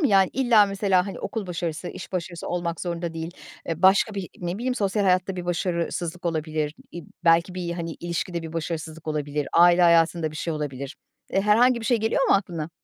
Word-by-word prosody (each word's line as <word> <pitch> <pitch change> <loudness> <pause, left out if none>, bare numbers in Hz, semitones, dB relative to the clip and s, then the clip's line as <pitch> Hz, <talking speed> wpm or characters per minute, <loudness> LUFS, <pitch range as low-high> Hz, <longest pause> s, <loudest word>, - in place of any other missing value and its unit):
mı? 295 - +4
Yani, 195 -3 +4
illa 240 -5 +5
mesela, 195 -2 +1
hani, 195 - -6
okul 220 -4 -4
başarısı, 170 -1 -4
iş - - -9
başarısı 175 -1 -4
olmak 175 -1 -2
zorunda 170 -1 -3
değil, 165 +1 -4 0.4
e, 165 +1 -3
başka 195 +3 +5
bir 195 -3 -4
ne 175 0 -3
bileyim 250 +2 -1
sosyal 205 -2 0
hayatta 185 0 +2
bir 180 - -4
başarısızlık 175 0 -2
olabilir, 155 -2 -2 0.2
i - - -6 0.3
belki 170 +2 +4
bir, 180 -2 -3
hani, 170 -1 -4
ilişkide 170 0 -3
bir 160 -1 -7
başarısızlık 160 -1 -5
olabilir. 150 -1 -2
Aile 175 +1 +6
hayatında 170 -1 +4
bir 155 - -9
şey 165 - -2
olabilir. 140 -3 -5 0.3
E, 195 - +2
herhangi 235 +4 +4
bir 225 - -5
şey 240 - +3
geliyor 225 +5 +1
mu - - +6
aklına? 170 -5 -2
175 Hz, 195 wpm, -25 LUFS, 165-195 Hz, 0.4 s, Aile